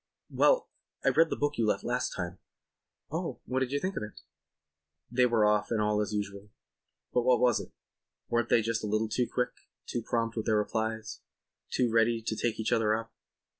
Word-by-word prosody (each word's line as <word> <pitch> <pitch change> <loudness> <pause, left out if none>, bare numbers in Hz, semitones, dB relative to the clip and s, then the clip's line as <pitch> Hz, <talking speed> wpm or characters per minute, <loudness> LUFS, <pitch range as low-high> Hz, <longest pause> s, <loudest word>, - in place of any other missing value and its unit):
"Well, - - +4 0.4
I - - +6
read 165 - +4
the - - -1
book 145 -1 -1
you 115 - +2
left - - +1
last 125 +1 -1
time." 90 -1 -4 0.7
"Oh, - - -3
what 130 +2 0
do 130 - +1
you 140 +3 -1
think 190 +5 -2
of - - -2
it?" 105 -7 -8 0.9
They 125 0 +4
were 115 -3 +3
off 105 0 +2
and 115 - 0
all 105 0 +2
was 105 -2 0
as 105 - -3
usual. 100 0 -4 0.6
But 125 - +3
was 125 -1 +4
it? - - -8 0.6
Weren't 120 0 0
they 115 - +4
just 115 0 -1
a - - -1
little 110 +1 0
too 120 +2 0
quick, 125 0 0 0.3
too 120 - -3
prompt 115 0 -1
with 110 - -3
their 110 -1 +3
replies, 110 +1 -2 0.5
too 125 -2 +1
ready 115 0 +3
to 110 0 -3
take 115 0 -1
each 110 - -1
other 110 -1 +3
up? 115 0 -6
115 Hz, 205 wpm, -30 LUFS, 105-120 Hz, 0.9 s, I